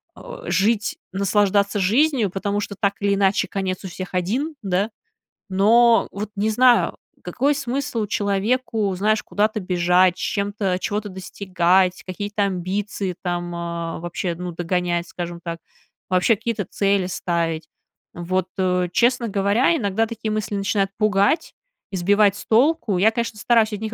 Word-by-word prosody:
о, - - -10
жить, 210 +1 +1 0.2
наслаждаться 200 +1 +2
жизнью. 235 +2 +2
Потому 200 +1 -2
что 200 -1 -5
так 200 -2 +2
или 200 0 +2
иначе 195 0 +2
конец 190 -1 -3
у - - -3
всех 185 +1 -7
один, 245 - -1
да? 195 +3 0 0.6
Но 230 +5 +4
вот 205 +1 -5
не 215 +2 +1
знаю, 245 +2 +4 0.3
какой 280 +3 0
смысл 255 -4 -2
человеку, 205 +1 0
знаешь, 215 +3 +1
куда-то 215 +1 0
бежать, 180 0 +3
с - - -8
чем-то 200 -2 -1
чего-то 210 +1 -3
достигать, 185 -1 +1
какие-то 205 +2 -3
амбиции 190 0 -2
там, 175 -1 -2
э, 170 -1 -4
вообще, 175 0 -3
ну, 180 0 -5
догонять, 175 0 -1
скажем 175 -1 -6
так, 170 -1 -4 0.5
вообще 185 +5 +3
какие-то 225 -2 -3
цели 200 -2 +1
ставить. 170 -3 -2 0.5
Вот, 185 +1 -2
э, 180 -1 +1
честно 245 0 +2
говоря, 200 - +2
иногда 220 -3 0
такие 225 -1 -5
мысли 215 -1 -2
начинают 195 -1 0
пугать 210 +6 +1 0.4
и - - -4
сбивать 200 +2 +3
с - - -9
толку. 240 - +2
Я, 215 +3 +5
конечно, 230 -2 -3
стараюсь 225 -3 +3
от 205 - -4
них 220 0 -4
200 Hz, 150 wpm, -22 LUFS, 185-220 Hz, 0.6 s, Я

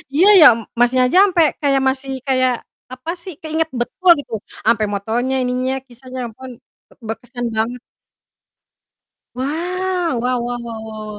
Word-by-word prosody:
Iya, 360 +6 +5
ya 305 - +11
m - - -6 0.2
masnya 250 +1 +4
aja 365 - +2
sampai 345 -5 +3 0.2
kayak 275 -2 +2
masih 270 0 -3 0.2
kayak, 255 -1 +2 0.4
apa 255 +6 -5
sih, 375 - -7
keinget 320 0 -1
betul, 365 +9 0
gitu. 285 - -9 0.3
Sampai 220 -1 +3
motornya, 235 +6 -1
ininya, 255 +1 -1
kisahnya, 255 +1 -10
ampun, 255 +3 -11 0.4
bek - - -24
berkesan 240 +2 -5
banget. 230 +3 -1 1.6
Wow! 345 +1 -2
Wow 250 0 0
wow 245 0 -3
wow 230 -1 -7
wow 215 -1 -8
255 Hz, 145 wpm, -19 LUFS, 240-310 Hz, 1.6 s, ya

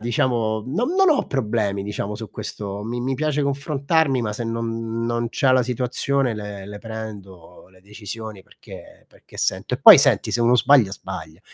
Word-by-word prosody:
diciamo, 115 -2 -1
non 225 - -1
m 370 - -2
non 385 -3 +5
ho 285 - +1
problemi 105 -6 -1
diciamo 105 0 -4
su 110 -3 -8
questo. 105 -1 -6
Mi 120 +3 -4
mi 130 +2 -2
piace 150 +1 -1
confrontarmi, 140 0 0
ma 105 -2 -2
se 110 +3 -5
non 115 0 -3
non 120 0 -1
c'ha 130 -1 +2
la 130 - +4
situazione 125 +1 -1
le 105 -2 -7
le 105 0 -8
prendo 100 -7 -10
le 95 -1 -22
decisioni, 105 0 -9
perché - - -15
perché - - -18
sento - - -1
e - - -5
poi, - - +10
senti, - - +3
se 120 - +1
uno 120 +1 +4
sbaglia, 125 -5 +4
sbaglia. 95 -4 -8
115 Hz, 180 wpm, -22 LUFS, 105-130 Hz, -, poi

